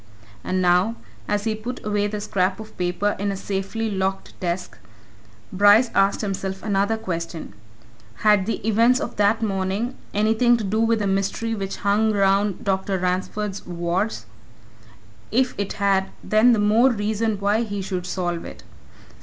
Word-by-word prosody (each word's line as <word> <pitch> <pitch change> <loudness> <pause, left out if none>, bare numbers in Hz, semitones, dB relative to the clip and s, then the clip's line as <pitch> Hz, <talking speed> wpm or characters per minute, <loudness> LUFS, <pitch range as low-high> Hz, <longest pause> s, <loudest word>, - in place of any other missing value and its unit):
And 185 0 -1
now, 180 +5 +3 0.3
as 205 0 0
he 220 0 0
put 235 +4 -6
away 205 -1 +1
the 210 0 -4
scrap 195 -2 0
of 220 0 -10
paper 180 +3 -1
in 200 0 -1
a 195 - -4
safely 200 +3 -3
locked 195 0 -2
desk, 180 0 -3 0.7
Bryce 205 +5 +5
asked 195 0 +2
himself 190 -2 -4
another 205 +1 +1
question: 170 - -5 0.7
Had 210 -2 +4
the 225 -1 -3
events 230 +4 +4
of 260 -5 -5
that 210 +2 +2
morning 195 +4 -1 0.2
anything 220 +3 +3
to 225 - -4
do 210 +2 -1
with 230 0 +3
the 210 - -1
mystery 195 +4 -1
which 195 -3 -4
hung 215 +2 +3
around 200 0 +2
Dr. 190 0 0
Ransford's 190 +2 -2
wards? 175 - -2 1.1
If 255 +2 +2
it 200 - -2
had, 195 -1 +1
then 215 +3 +3
all 245 - +7
the 220 - +2
more 215 +5 +4
reason 220 -1 -1
why 205 +3 +2
he 205 -4 -3
should 185 -2 -4
solve 175 -3 -2
it. - - -10
205 Hz, 160 wpm, -23 LUFS, 190-220 Hz, 1.1 s, all